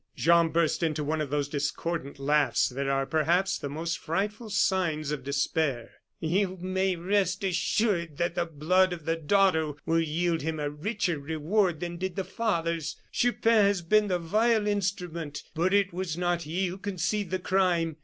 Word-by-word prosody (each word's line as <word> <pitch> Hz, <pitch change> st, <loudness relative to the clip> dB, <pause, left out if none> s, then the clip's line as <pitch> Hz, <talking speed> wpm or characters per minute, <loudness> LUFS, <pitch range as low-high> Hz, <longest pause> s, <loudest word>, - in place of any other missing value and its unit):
Jean 170 Hz, 0 st, +4 dB
burst 165 Hz, +1 st, +1 dB
into 155 Hz, -2 st, 0 dB
one 155 Hz, +2 st, -1 dB
of 150 Hz, -, -3 dB
those 145 Hz, 0 st, 0 dB
discordant 145 Hz, +1 st, -3 dB
laughs 140 Hz, -2 st, +2 dB
that 135 Hz, +2 st, -3 dB
are, 135 Hz, 0 st, +1 dB
perhaps, 170 Hz, +6 st, +1 dB
the 140 Hz, -, -4 dB
most 165 Hz, +3 st, -3 dB
frightful 210 Hz, +7 st, -3 dB
signs 170 Hz, -7 st, +1 dB
of 145 Hz, -4 st, -3 dB
despair. 140 Hz, -2 st, -1 dB, 0.3 s
"You 185 Hz, +3 st, 0 dB
may 190 Hz, +1 st, 0 dB
rest 190 Hz, +2 st, 0 dB
assured 180 Hz, -3 st, 0 dB
that 170 Hz, 0 st, 0 dB
the 175 Hz, 0 st, -1 dB
blood 180 Hz, +4 st, +2 dB
of 165 Hz, -4 st, -8 dB
the 165 Hz, -, +1 dB
daughter 165 Hz, -2 st, +2 dB
will 165 Hz, +1 st, +2 dB
yield 165 Hz, +1 st, 0 dB
him 160 Hz, +1 st, -3 dB
a 145 Hz, -1 st, -2 dB
richer 180 Hz, +1 st, -2 dB
reward 160 Hz, +4 st, 0 dB
than 175 Hz, 0 st, -4 dB
did 185 Hz, 0 st, -3 dB
the 195 Hz, -, -1 dB
father's. 170 Hz, -8 st, -2 dB, 0.2 s
Chupin 230 Hz, -3 st, +3 dB
has 200 Hz, -3 st, +1 dB
been 210 Hz, +5 st, +3 dB
the 180 Hz, -2 st, +1 dB
vile 215 Hz, +6 st, +2 dB
instrument; 180 Hz, -7 st, -2 dB
but 170 Hz, +3 st, +1 dB
it 200 Hz, -2 st, +2 dB
was 175 Hz, -3 st, -3 dB
not 175 Hz, -1 st, 0 dB
he 170 Hz, +5 st, -2 dB
who 185 Hz, +2 st, -4 dB
conceived 195 Hz, 0 st, -2 dB
the 185 Hz, -, 0 dB
crime. 180 Hz, -4 st, +1 dB
170 Hz, 175 wpm, -28 LUFS, 155-190 Hz, 0.3 s, Jean